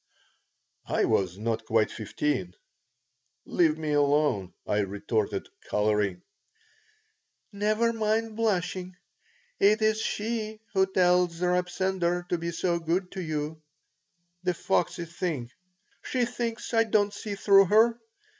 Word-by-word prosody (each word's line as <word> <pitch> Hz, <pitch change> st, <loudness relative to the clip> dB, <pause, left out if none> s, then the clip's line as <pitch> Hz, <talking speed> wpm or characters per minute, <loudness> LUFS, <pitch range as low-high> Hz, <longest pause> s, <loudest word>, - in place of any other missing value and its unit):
I -, -, +1 dB
was 95 Hz, -1 st, +1 dB
not 115 Hz, +1 st, -2 dB
quite 110 Hz, -1 st, +2 dB
fifteen 110 Hz, -4 st, -2 dB, 0.9 s
"Leave 160 Hz, -3 st, +2 dB
me 155 Hz, -1 st, -3 dB
alone," 145 Hz, -9 st, +2 dB
I 105 Hz, -, 0 dB
retorted, 100 Hz, +2 st, -1 dB, 0.2 s
coloring 105 Hz, -3 st, +1 dB, 1.3 s
"Never 215 Hz, +3 st, +1 dB
mind 220 Hz, 0 st, 0 dB
blushing. 185 Hz, -4 st, -1 dB, 0.6 s
It 215 Hz, +2 st, +4 dB
is 215 Hz, 0 st, +2 dB
she 220 Hz, 0 st, -3 dB
who 190 Hz, 0 st, +3 dB
tells 180 Hz, -2 st, +3 dB
Reb 180 Hz, 0 st, +1 dB
Sender 175 Hz, -2 st, -1 dB
to 175 Hz, -, 0 dB
be 170 Hz, +1 st, -3 dB
so 170 Hz, +1 st, 0 dB
good 175 Hz, +3 st, -1 dB
to 190 Hz, -, -5 dB
you. 155 Hz, -1 st, -4 dB, 0.8 s
The 180 Hz, -1 st, 0 dB
foxy 175 Hz, -2 st, 0 dB
thing! 160 Hz, -8 st, -4 dB, 0.5 s
She 250 Hz, -2 st, 0 dB
thinks 235 Hz, -1 st, -4 dB
I 225 Hz, 0 st, +5 dB
don't 205 Hz, -2 st, +2 dB
see 205 Hz, 0 st, -5 dB
through 195 Hz, 0 st, +6 dB
her. 225 Hz, +4 st, +4 dB
180 Hz, 120 wpm, -27 LUFS, 150-210 Hz, 1.3 s, through